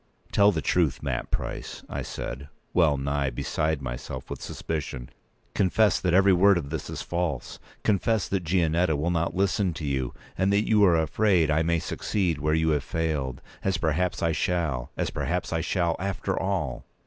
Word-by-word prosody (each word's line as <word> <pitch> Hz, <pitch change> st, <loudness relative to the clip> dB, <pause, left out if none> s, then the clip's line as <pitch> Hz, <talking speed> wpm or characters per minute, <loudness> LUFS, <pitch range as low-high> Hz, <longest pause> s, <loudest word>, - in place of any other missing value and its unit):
"Tell 100 Hz, 0 st, +5 dB
the 80 Hz, -5 st, -2 dB
truth, 75 Hz, -6 st, +1 dB
Mat -, -, -2 dB
Price," -, -, -4 dB
I -, -, -4 dB
said, 70 Hz, +3 st, -6 dB, 0.2 s
well 80 Hz, -5 st, +4 dB
nigh 70 Hz, 0 st, 0 dB
beside 75 Hz, +4 st, -1 dB
myself -, -, -6 dB
with -, -, -5 dB
suspicion. 70 Hz, -5 st, -5 dB, 0.4 s
"Confess 100 Hz, +1 st, +3 dB
that 90 Hz, -1 st, +1 dB
every 95 Hz, 0 st, +6 dB
word 95 Hz, +2 st, +5 dB
of 75 Hz, -4 st, -4 dB
this 80 Hz, -, -4 dB
is -, -, -5 dB
false! 85 Hz, -7 st, -3 dB, 0.2 s
Confess 105 Hz, +1 st, +1 dB
that 95 Hz, -2 st, -1 dB
Gianetta 85 Hz, -1 st, +2 dB
will 80 Hz, +4 st, 0 dB
not 85 Hz, -1 st, 0 dB
listen 95 Hz, -2 st, +1 dB
to 80 Hz, -, -5 dB
you, 65 Hz, -3 st, -2 dB, 0.2 s
and 95 Hz, +1 st, +2 dB
that 100 Hz, +2 st, +2 dB
you 105 Hz, -2 st, +4 dB
are 85 Hz, -3 st, +5 dB
afraid 85 Hz, 0 st, +2 dB
I 80 Hz, +2 st, +3 dB
may 85 Hz, +1 st, +2 dB
succeed 85 Hz, -1 st, -1 dB
where 75 Hz, +2 st, +1 dB
you 80 Hz, 0 st, +2 dB
have 75 Hz, -3 st, +1 dB
failed. 75 Hz, -5 st, -2 dB, 0.2 s
As 95 Hz, -2 st, +1 dB
perhaps 85 Hz, +2 st, 0 dB
I 85 Hz, -, +3 dB
shall—as 80 Hz, -6 st, -1 dB
perhaps 90 Hz, -1 st, -2 dB
I 80 Hz, -, 0 dB
shall, 85 Hz, -1 st, 0 dB
after 100 Hz, +1 st, -2 dB
all!" -, -, -2 dB
85 Hz, 175 wpm, -26 LUFS, 75-90 Hz, 0.4 s, every